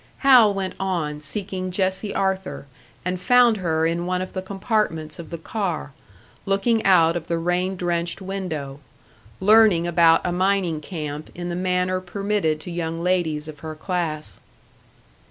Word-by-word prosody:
Hal 245 -6 +8
went 195 -1 -3
on, 170 -6 -2
seeking 185 +3 -4
Jessie 190 +2 -1
Arthur, 190 -5 -2 0.4
and 180 0 -2
found 240 +2 +5
her 160 -4 0
in 170 +1 -1
one 180 0 0
of 185 0 -5
the 185 - -3
compartments 190 -6 -2
of 165 - -8
the 170 - -5
car, 170 -5 -3 0.5
looking 215 +3 +2
out 170 -4 +5
of 170 -2 -4
the 170 - 0
rain 180 +3 0
drenched 175 -1 -1
window 180 -8 -5 0.6
learning 210 -4 +5
about 170 -1 +4
a 180 - 0
mining 180 -3 +1
camp 150 -3 -6
in 175 0 -5
the 175 - -3
manner 185 0 0
permitted 195 -4 -1
to 175 - -7
young 165 -1 -3
ladies 165 -3 0
of 150 -2 -9
her 155 +1 -7
class. 160 -2 -3
180 Hz, 155 wpm, -23 LUFS, 165-190 Hz, 0.6 s, Hal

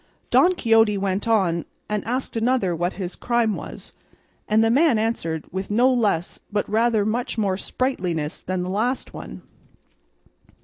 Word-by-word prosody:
Don 365 +1 +5
Quixote 225 -7 +3
went 195 +2 -1
on 185 -7 +2 0.2
and 210 -1 -2
asked 250 +3 -3
another 225 -6 +1
what 175 +3 -1
his 185 -2 -5
crime 235 -3 +1
was, - - -9 0.5
and 215 +1 +3
the 225 - +3
man 285 -1 +4
answered 190 -8 -2
with 190 +1 -4
no 245 +5 +4
less 205 -8 0
but 205 0 -1
rather 220 -1 +2
much 235 +3 -2
more 200 -4 +1
sprightliness 180 - -2
than 185 0 -2
the 180 - -4
last 235 +6 -1
one. - - -9
215 Hz, 150 wpm, -23 LUFS, 185-235 Hz, 0.5 s, Don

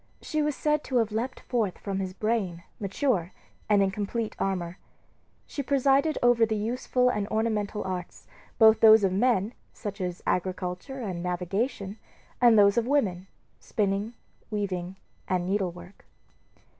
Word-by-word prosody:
She 310 -1 -1
was 295 -1 0
said 300 0 0
to 260 - -4
have 225 -2 +1
leaped 240 +4 -3
forth 220 -7 -1
from 195 -1 -4
his 190 -1 -3
brain, 200 -6 -1 0.2
mature, 200 -2 -1 0.4
and 205 -2 +5
in 190 - +1
complete 210 +3 -3
armor. 180 -2 -2 0.7
She 285 - -4
presided 280 +3 +2
over 245 -1 +5
the 220 -1 +2
useful 250 +3 +1
and 210 -4 -1
ornamental 215 -2 -1
arts, 185 -2 -6 0.3
both 220 -1 +7
those 220 -1 +8
of 190 -1 +2
men 220 0 +2 0.2
such 205 -3 -6
as 180 -1 -4
agriculture 185 +7 -2
and 185 -6 -4
navigation 195 +4 -2 0.4
and 235 -2 +7
those 200 +2 +6
of 235 - -3
women, 195 -10 0 0.3
spinning, 205 +2 -1 0.3
weaving, 190 -4 -3 0.3
and 180 -1 0
needlework. 180 -1 -3
210 Hz, 145 wpm, -27 LUFS, 185-235 Hz, 0.7 s, those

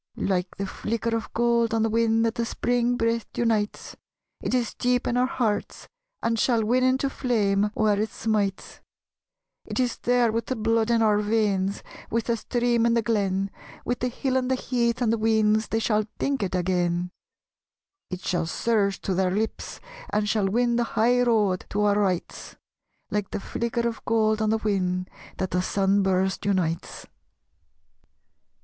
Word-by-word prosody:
Like 180 -2 -1
the 195 - -2
flicker 230 +4 -2
of 225 - -4
gold 235 -1 +2
on 225 - +2
the 225 - +1
whin 225 0 +2
That 225 -1 +1
the 235 - -2
Spring 245 +1 0
breath 230 0 0
unites, 220 -3 -1 0.5
It - - -1
is 245 -2 0
deep 245 0 0
in 240 - 0
our 250 +1 +3
hearts, 225 -6 -2 0.4
and 230 -1 +1
shall 230 -3 +2
win 250 +3 +2
Into 260 +2 +2
flame 210 -7 +1
where 210 -2 +2
it 220 - -1
smites: 205 -3 -2 0.8
It - - -5
is 250 -2 0
there 245 -2 +2
with 230 0 -2
the 260 - -1
blood 225 0 +1
in 230 -1 +3
our 210 -1 +3
veins, 205 -2 0 0.3
With 230 0 0
the 235 +1 0
stream 240 0 +1
in 235 - +2
the 230 - +2
glen, 195 -3 0 0.3
With 245 +1 -1
the 250 - 0
hill 260 +1 -1
and 255 -1 -1
the 260 - +2
heath 245 -1 0
and 225 -1 +2
the 230 - -1
weans 220 0 +2
They 225 - -1
shall 215 -1 +1
think 275 -2 -1
it 190 -2 -2
again; 180 -1 0 1.0
It 185 0 -5
shall 175 -2 -1
surge 200 0 0
to 190 - -1
their 185 0 +1
lips 215 +4 -3 0.3
and 210 0 0
shall 210 -2 +1
win 235 +3 +1
The 240 - +2
high 245 +3 +4
road 215 -6 +1
to 205 - -1
our 205 0 +3
rights 185 -4 -2 0.6
Like 205 -1 -1
the - - -3
flicker 235 +3 -2
of 230 -2 -5
gold 220 -1 +2
on 215 - +1
the 220 - +2
whin 185 -4 -1 0.3
That 190 -2 -2
the 180 - +1
sun 195 +1 +1
burst 190 0 0
unites. 180 -5 -1
220 Hz, 175 wpm, -25 LUFS, 200-235 Hz, 1.0 s, high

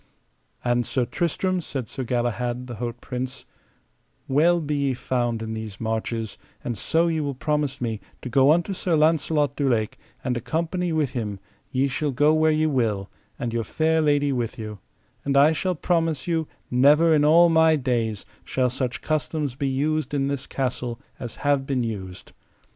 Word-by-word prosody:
And, 120 0 +2
Sir 125 +1 0
Tristram, 180 +5 -1
said 135 -7 -5
Sir 130 - -5
Galahad, 120 0 -1
the 120 -3 -7
haut 120 +1 -4
prince, 130 +1 -5 0.8
well 165 +6 +4
be 150 -2 -2
ye 140 -2 +1
found 120 -3 -1
in 110 0 -4
these 110 -3 -6
marches, 110 0 -3 0.2
and 120 - -2
so 165 - +1
ye 165 -2 +1
will 140 -3 -2
promise 145 -1 -1
me 115 -3 -3 0.2
to - - -4
go 135 +3 +4
unto 175 +5 +2
Sir 180 -2 0
Launcelot 155 -2 +2
du 140 -2 +1
Lake, 110 -2 0 0.2
and 125 - 0
accompany 170 - -1
with 155 -5 +1
him, 105 -6 -3 0.3
ye 135 +2 +1
shall 145 +3 -1
go 145 +3 +3
where 155 0 +4
ye 155 0 +2
will, 115 -9 0 0.3
and 120 -4 -3
your 115 -1 0
fair 160 +8 +1
lady 145 -2 +2
with 120 0 -2
you; 105 -2 -6 0.4
and 140 -1 +1
I 145 +3 +7
shall 185 +3 -1
promise 165 -2 0
you 165 -3 0 0.2
never 150 +6 +5
in 150 -1 +4
all 170 +3 +6
my 160 -1 +5
days 120 -7 -1 0.2
shall 125 -2 0
such 130 -1 -2
customs 155 -2 -1
be 140 +2 -2
used 150 +3 0
in 135 -1 +1
this 140 -2 -3
castle 125 -3 -2 0.2
as 120 -3 -6
have 140 -2 +2
been 130 -3 0
used. 95 -5 -6
135 Hz, 175 wpm, -24 LUFS, 120-155 Hz, 0.8 s, I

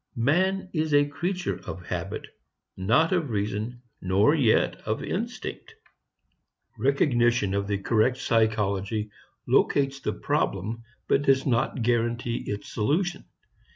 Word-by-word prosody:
Man 185 +10 +1
is 155 -2 +1
a 145 0 +5
creature 175 +6 -3
of 90 -2 -7
habit, - - -4 0.5
not 115 - +2
of 170 -7 +1
reason 110 +3 -3 0.2
nor 95 +9 +3
yet 130 -9 +3
of 110 +1 -3
instinct. 235 - -5 1.0
Recognition 120 -4 +2
of 100 0 -1
the 100 -1 0
correct 115 +5 +2
psychology 110 -3 0 0.4
locates 140 -1 +2
the - - -2
problem 105 +5 -1 0.3
but 135 - +3
does 135 -1 +3
not 120 -1 0
guarantee 120 0 0
its 105 0 -4
solution. 175 - 0
120 Hz, 120 wpm, -26 LUFS, 105-145 Hz, 1.0 s, a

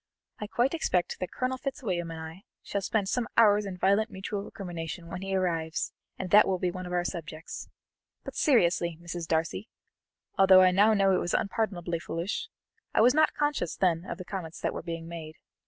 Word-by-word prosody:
"I 210 - -4
quite 240 +6 +1
expect 185 - 0
that 185 - -4
Colonel 255 0 -2
Fitzwilliam 190 -12 -3
and 165 0 -6
I 160 +3 -8 0.2
shall 200 - -2
spend 205 0 0
some 240 +3 0
hours 210 -2 +5
in 185 -2 -6
violent 200 +5 +2
mutual 195 +2 -4
recrimination 170 -4 -6
when 180 - -5
he 195 0 -2
arrives, 165 -3 -1 0.2
and 185 -2 -5
that 210 +1 +7
will 190 -1 +1
be 180 0 -1
one 185 0 -6
of - - -7
our 175 0 +1
subjects. 160 -1 -6 0.5
But, - - -8
seriously, 175 - +3
Mrs. 170 -1 -6
Darcy, 160 - -1 0.7
although 190 -1 +8
I 185 0 +6
know 210 +4 +5
now 195 -1 +4
it - - +3
was 175 - -1
unpardonably 180 -5 -1
foolish, 180 - -3 0.5
I - - +5
was 245 +3 +6
not 310 +1 +3
conscious 295 - 0
then 170 -3 +1
of - - -5
the 185 - -8
comments 175 -4 -6
that - - -1
were - - -4
being 165 -1 -6
made. 160 -2 -8
185 Hz, 195 wpm, -28 LUFS, 170-205 Hz, 0.7 s, although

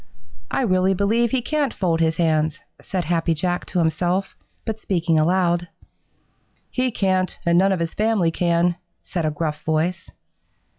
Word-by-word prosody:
"I - - 0
really 185 -3 +2
believe 225 +5 +2
he 250 0 0
can't 295 -1 0
fold 170 -4 0
his 160 0 +1
hands," 155 -3 +1 0.2
said 185 -3 -3
Happy 165 0 +1
Jack 175 +3 -2
to - - -3
himself, 175 +3 0 0.3
but 220 -1 -3
speaking 170 -5 +1
aloud. 175 +1 +2 1.0
"He 255 0 0
can't, 185 -4 0
and 170 0 +3
none 195 +1 +4
of 190 - 0
his 165 -1 -2
family 215 -6 +1
can," 170 +1 +1 0.3
said 170 -3 -3
a - - +2
gruff 150 0 -3
voice. 160 +3 -1
175 Hz, 155 wpm, -22 LUFS, 165-195 Hz, 1.0 s, none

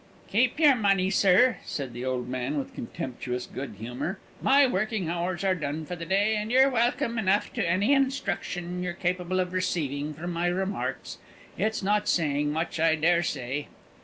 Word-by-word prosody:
"Keep 245 +7 +2
your 300 -3 +7
money, 195 -4 +2
sir," 205 +6 +4
said 135 -4 -5
the 120 +1 -6
old 130 -1 -2
man, 130 +3 -2
with 140 - -4
contemptuous 125 +1 -5
good 135 -5 -7
humour. 125 - -4 0.2
"My 280 +1 +5
working 215 -5 -1
hours 175 +2 -2
are 190 -1 +3
done 155 -2 -3
for 180 - -5
the 165 -1 -7
day, 200 +4 +2
and 210 +2 -3
you're 265 +2 +5
welcome 235 -1 +1
enough 200 0 +1
to 210 -8 -1
any 200 +10 +3
instruction 180 -10 -1
you're 180 -1 -2
capable 180 +1 -1
of 180 0 -1
receiving 150 -5 -2
from 175 +3 -5
my 170 +1 0
remarks. 190 +3 -3 0.4
It's 220 -2 -1
not 210 +1 +1
saying 150 -3 +1
much, 160 +1 -2
I 160 0 +4
dare 170 +2 +3
say." 140 -2 -3
180 Hz, 175 wpm, -27 LUFS, 150-205 Hz, 0.4 s, your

